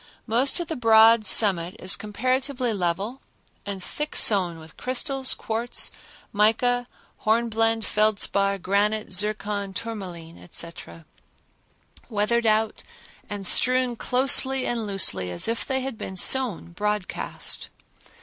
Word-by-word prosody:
Most 250 +8 +1
of 345 - -5
the 320 - -5
broad 225 -1 +4
summit 185 -4 +4
is 185 - +3
comparatively 255 +3 -3
level 195 +7 -4 0.5
and 195 -2 -6
thick 300 +8 -6
sown 185 -6 +5
with 160 0 -15
crystals, 260 +1 0
quartz, 230 +2 -2 0.4
mica, 240 +4 +1 0.3
hornblende, 225 0 -1
feldspar, 200 -2 0
granite, 205 +2 -1
zircon, 205 0 -3
tourmaline, 180 -8 -8
etc., 165 -1 -7 1.0
weathered 230 +2 0
out 215 0 0 0.5
and 205 -1 -6
strewn 255 +4 +3
closely 265 +2 +4
and 230 -3 -3
loosely 195 - +2
as 90 - 0
if 230 0 -2
they 265 0 -3
had 260 -4 -6
been 190 - -7
sown 220 -4 +2
broadcast. 210 +1 -4
215 Hz, 115 wpm, -23 LUFS, 195-245 Hz, 1.0 s, sown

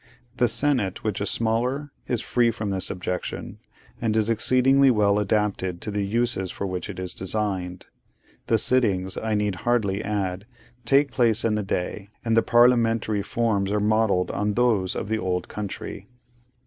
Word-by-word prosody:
The 125 - +3
Senate, 120 -6 +1
which 105 -3 -2
is 100 - 0
smaller, 125 +6 -1 0.2
is 120 -3 -1
free 120 -1 +2
from 110 -3 -3
this 95 -1 +1
objection, 90 -1 -5 0.4
and 110 -2 0
is 110 +1 +2
exceedingly 130 +4 +4
well 105 -3 +3
adapted 100 -3 -1
to 105 - -4
the 100 0 -1
uses 110 -2 -1
for 100 - -5
which 90 -2 -4
it - - -7
is 90 -1 -5
designed. 95 -2 -3 0.6
The 115 - +3
sittings, 100 -6 +1
I 110 -1 -2
need 105 -3 -1
hardly 105 -2 0
add, 100 -1 -3 0.4
take 140 +2 +3
place 115 -2 +2
in 115 - +2
the 105 - 0
day; 95 +1 -3 0.2
and 115 -1 +2
the 115 - +5
parliamentary 115 -3 +3
forms 100 -3 0
are 105 - +1
modelled 105 -3 +1
on 105 0 -1
those 110 -7 +1
of - - -3
the 110 +1 -1
old 90 -2 -2
country. 105 -2 -6
105 Hz, 165 wpm, -24 LUFS, 95-115 Hz, 0.6 s, the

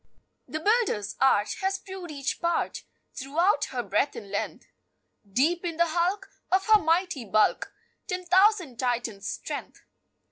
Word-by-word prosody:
"The 310 - -4
builder's 405 - +1
art 215 -6 +3
Has 385 +1 0
proved 380 -2 -9
each 280 -2 -3
part 340 0 -1 0.3
Throughout 295 +4 +1
her 245 -2 -4
breadth 210 +7 0
and 200 -3 -9
length; 205 - -3 0.7
Deep 320 - +2
in 335 -2 -3
the 340 0 +3
hulk, 350 +5 0 0.2
Of 380 +1 +3
her 430 -1 +7
mighty 330 -4 +1
bulk, 215 0 +2 0.4
Ten 360 0 -3
thousand 370 - +3
Titans' 240 -5 -2
strength." - - -6
330 Hz, 140 wpm, -27 LUFS, 245-370 Hz, 0.7 s, her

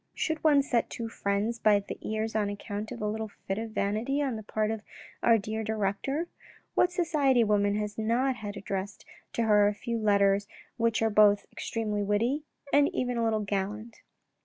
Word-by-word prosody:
" - - -43
Should 315 -1 -2
one 290 -3 +5
set 245 -4 0
two 230 -1 -5
friends 210 +2 -1
by 210 -2 +5
the 200 - -8
ears 220 +1 -3
on 210 -2 +1
account 205 +1 -5
of 235 -3 -5
a - - 0
little 220 +1 -2 0.2
fit 195 +2 -1
of 225 0 -4
vanity 215 +7 -1
on 275 -5 0
the 220 - -5
part 215 0 -1
of 220 -1 -4 0.4
our 230 - +5
dear 220 +1 -3
director? 220 - -1 0.5
What 360 - +3
society 300 -8 +2
woman 205 -1 +2
has 210 0 -3
not 245 +4 +1
had 205 -2 -6
addressed 195 0 -5 0.3
to 235 - 0
her 210 -2 +5
a 205 - 0
few 230 +2 -3
letters 200 -1 +3 0.3
which 230 -1 +1
were 225 0 +2
both 205 -1 +5
extremely 215 -2 -2
witty 225 +8 +1 0.3
and 285 0 +5
even 250 -1 -1
a 235 - 0
little 220 -1 +1
gallant 205 +3 -4
220 Hz, 190 wpm, -29 LUFS, 205-235 Hz, 0.5 s, one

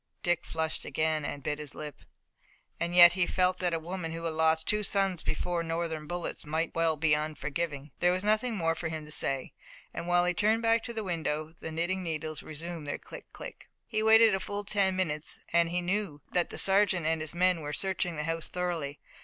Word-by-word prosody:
Dick 175 -1 +1
flushed 160 0 -2
again 155 -1 0
and 145 -1 -5
bit 150 +2 -2
his 150 -2 -7
lip. 150 -2 -8 0.8
And 170 +1 -1
yet 175 -1 +10
he 180 -1 +1
felt 185 -1 +1
that 180 -1 +1
a - - +1
woman 165 0 -5
who 165 0 -6
had 165 -1 -1
lost 160 0 +2
two 210 0 +3
sons 195 -4 +1
before 175 +2 -1
Northern 165 -2 -3
bullets 175 +1 -4
might 160 +2 -2
well 165 -1 +2
be 155 0 +2
unforgiving. 150 -1 -2
There 175 - +4
was 185 +1 -1
nothing 220 +3 +2
more 165 -4 +1
for 160 0 -4
him 160 -1 -5
to 150 - -11
say, 135 -3 0 0.4
and 170 - -5
while 175 0 +4
he 180 - +2
turned 215 +5 +2
back 230 0 +4
to 235 - -4
the 220 -1 -3
window 155 -4 -2
the 160 - -6
knitting 175 +4 -1
needles 155 -3 -3
resumed 160 0 -6
their 145 - -2
click, - - -12
click. - - -10 0.2
He 215 -2 -1
waited 220 0 +7
a 190 - +1
full 205 +1 -4
ten 195 -2 +2
minutes 155 -5 -2 0.2
and 170 -1 +4
he 180 +1 0
knew 175 -5 -2
that 175 -1 +1
the - - -6
sergeant 190 -3 +4
and 160 0 +1
his 155 +2 -5
men 180 -1 +3
were 150 -1 -4
searching 180 0 -1
the 150 - -3
house 165 0 -2
thoroughly. 170 -6 -3
170 Hz, 215 wpm, -30 LUFS, 155-185 Hz, 0.8 s, yet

